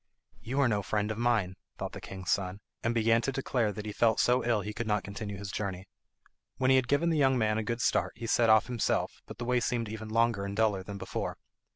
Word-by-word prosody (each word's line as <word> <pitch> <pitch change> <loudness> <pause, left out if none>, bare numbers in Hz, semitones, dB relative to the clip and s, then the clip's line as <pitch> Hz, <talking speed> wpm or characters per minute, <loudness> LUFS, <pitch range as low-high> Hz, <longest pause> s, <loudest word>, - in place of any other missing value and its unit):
"You 130 +4 -2
are 135 - +4
no 105 -3 +1
friend 105 +2 -1
of 110 - -4
mine," 115 -6 +1 0.2
thought - - -4
the - - -8
king's 95 -2 -5
son, 95 0 -1 0.2
and 115 - +1
began 115 0 +3
to 135 - -1
declare 125 -4 0
he 105 +1 -5
felt 110 +1 +2
so 125 0 +3
ill 115 -3 +2
he 105 +2 -5
could 115 +1 -4
not 105 -2 +1
continue 100 0 -6
his 100 0 -6
journey. 95 -3 -4 0.7
When 130 0 +3
he - - +6
had 130 -2 +3
given 150 +6 +2
the 160 - +1
young 135 -2 +4
man 110 -2 +1
a - - -2
good 115 +2 -2
start - - +1
he 115 +1 -7
set 115 0 +3
off 110 0 +6
himself, 120 -3 -1
but - - -9
the 120 - -4
way 125 0 +2
seemed 120 -2 -1
even 110 0 -6
longer 115 -2 +2
and 100 0 -4
duller 105 -3 +2
than 100 +2 -7
before. - - -4
110 Hz, 245 wpm, -30 LUFS, 100-120 Hz, 0.7 s, he